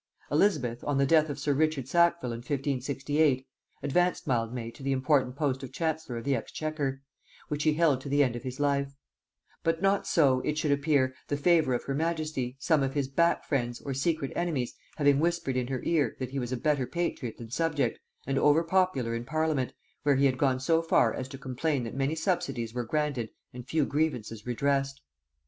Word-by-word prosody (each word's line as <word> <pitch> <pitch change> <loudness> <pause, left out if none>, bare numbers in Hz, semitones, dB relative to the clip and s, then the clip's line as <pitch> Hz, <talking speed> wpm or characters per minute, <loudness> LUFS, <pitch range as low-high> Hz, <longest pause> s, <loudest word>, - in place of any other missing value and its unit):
Elizabeth, 125 - +1
on 145 -2 0
the 140 - +4
death 155 +1 +4
of 145 - -4
sir 145 0 0
Richard 150 -3 0
Sackville 170 -3 +2
in 115 - -4
1568, 140 +1 0 0.4
advanced 175 +6 +1
Mildmay 115 -2 -1
to 135 - -15
the 135 0 0
important 130 -1 +2
post 140 -3 -1
of 135 - -7
chancellor 160 -6 -2
of 115 - -5
the 140 0 +1
exchequer, 140 +1 -3 0.5
which 150 0 -2
he 155 0 +3
held 155 -5 +3
to 140 - -7
the 145 +1 +4
end 125 -3 0
of 120 - -5
his 130 0 -6
life; 140 -1 0 0.7
but 165 0 0
not 195 +1 +2
so, 135 -6 +4
it 150 +3 -2
should 155 -2 +1
appear, 140 -2 +2
the 145 - -1
favor 155 -4 +3
of - - -3
her 140 - -3
majesty, 155 -5 -2
some 155 +1 +2
of 135 +1 -1
his 140 -2 0
back 170 +5 +2
friends, 120 -4 -1
or 140 - -4
secret 140 +1 -1
enemies, 155 -8 -1 0.2
having 145 -2 +3
whispered 170 -4 0
in 125 -1 0
her 130 -1 -3
ear, 150 -8 +1
that 130 -1 -5
he 135 - -2
was 125 -1 -4
a 130 - -1
better 140 -1 +1
patriot 135 -7 -3
than 115 -1 -10
subject, 145 -5 0 0.3
and 135 0 0
over 150 +4 +4
popular 165 -9 +1
in 115 0 -3
parliament, 155 -1 0 0.3
where 145 -1 +3
he 140 +1 +3
had 130 -2 +3
gone 130 -2 +2
so 165 +5 +2
far 165 - +3
as 130 - -4
to 135 0 -9
complain 135 +1 -1
that 115 - -5
many 140 +3 0
subsidies 135 - -1
were 120 -1 -2
granted 140 -4 -1 0.2
and 125 0 -9
few 155 -1 +1
grievances 125 -8 -2
redressed. 135 +2 0
140 Hz, 200 wpm, -29 LUFS, 130-155 Hz, 0.7 s, the